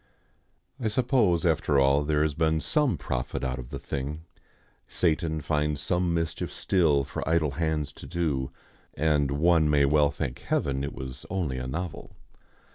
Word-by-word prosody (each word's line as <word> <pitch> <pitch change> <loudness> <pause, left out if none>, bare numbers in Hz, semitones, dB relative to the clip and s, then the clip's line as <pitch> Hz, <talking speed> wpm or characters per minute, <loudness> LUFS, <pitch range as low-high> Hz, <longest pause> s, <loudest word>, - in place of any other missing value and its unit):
I 115 - -1
suppose, 110 -7 +2
after 75 -3 +2
all, 70 +2 +4
there 75 0 +1
has 80 -1 0
been 80 +1 +1
some 145 - +1
profit 65 -3 -3
out 65 0 -2
of - - -8
the 70 - -5
thing. 70 +4 -5 0.6
Satan 80 -2 0
finds 75 -1 0
some 90 +4 0
mischief 85 -1 -2
still 80 -7 +2
for 70 - -5
idle 80 -3 +2
hands 75 -2 -1
to - - -11
do, 75 -5 -1 0.5
and 75 -2 +2
one 80 +2 +3
may 70 -1 +4
well 75 0 +4
thank 70 -3 -4
Heaven 70 0 -1
it 70 - -4
was 65 0 -7
only 85 -9 -2
a 65 - -4
novel. 85 +5 -5
75 Hz, 160 wpm, -27 LUFS, 70-85 Hz, 0.6 s, all